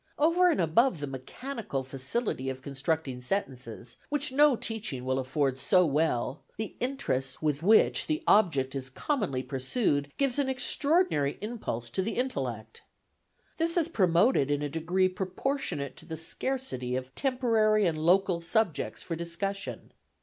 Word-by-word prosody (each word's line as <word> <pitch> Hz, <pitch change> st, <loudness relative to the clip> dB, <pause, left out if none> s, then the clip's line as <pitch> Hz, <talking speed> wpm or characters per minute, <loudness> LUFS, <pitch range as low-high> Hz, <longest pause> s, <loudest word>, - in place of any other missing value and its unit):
Over 340 Hz, +4 st, +4 dB
and 325 Hz, -, +1 dB
above 175 Hz, -, +3 dB
the 145 Hz, -, -3 dB
mechanical 140 Hz, -, -5 dB
facility 135 Hz, -, -2 dB
of 130 Hz, 0 st, -6 dB
constructing 140 Hz, -1 st, -2 dB
sentences, 125 Hz, -, -4 dB
which 290 Hz, -2 st, +2 dB
no 290 Hz, 0 st, +5 dB
teaching 210 Hz, -, -4 dB
will 130 Hz, 0 st, 0 dB
afford 135 Hz, 0 st, -1 dB
so 180 Hz, +7 st, +4 dB
well, 145 Hz, -3 st, 0 dB, 0.2 s
the 220 Hz, 0 st, -5 dB
interest 160 Hz, -, -2 dB
with 150 Hz, -1 st, 0 dB
which 215 Hz, +6 st, +4 dB
the 310 Hz, 0 st, -1 dB
object 150 Hz, -11 st, +3 dB
is 130 Hz, -1 st, -4 dB
commonly 175 Hz, -, -2 dB
pursued 145 Hz, -, 0 dB
gives 275 Hz, -1 st, +3 dB
an 275 Hz, -2 st, +1 dB
extraordinary 265 Hz, -, +2 dB
impulse 210 Hz, -, -4 dB
to 190 Hz, -, 0 dB
the 215 Hz, +4 st, -2 dB
intellect. 125 Hz, -, -3 dB, 0.8 s
This 335 Hz, +1 st, +1 dB
is 335 Hz, -1 st, +2 dB
promoted 180 Hz, -, +3 dB
in 145 Hz, 0 st, 0 dB
a 145 Hz, -, -2 dB
degree 175 Hz, +5 st, +1 dB
proportionate 185 Hz, -, -3 dB
to -, -, -11 dB
the 160 Hz, -2 st, -5 dB
scarcity 160 Hz, -, -3 dB
of 130 Hz, 0 st, -5 dB
temporary 225 Hz, -6 st, +2 dB
and 165 Hz, -3 st, +1 dB
local 180 Hz, +1 st, +3 dB
subjects 185 Hz, 0 st, 0 dB
for 170 Hz, -, -4 dB
discussion. 170 Hz, +4 st, -4 dB
170 Hz, 145 wpm, -29 LUFS, -, 0.8 s, no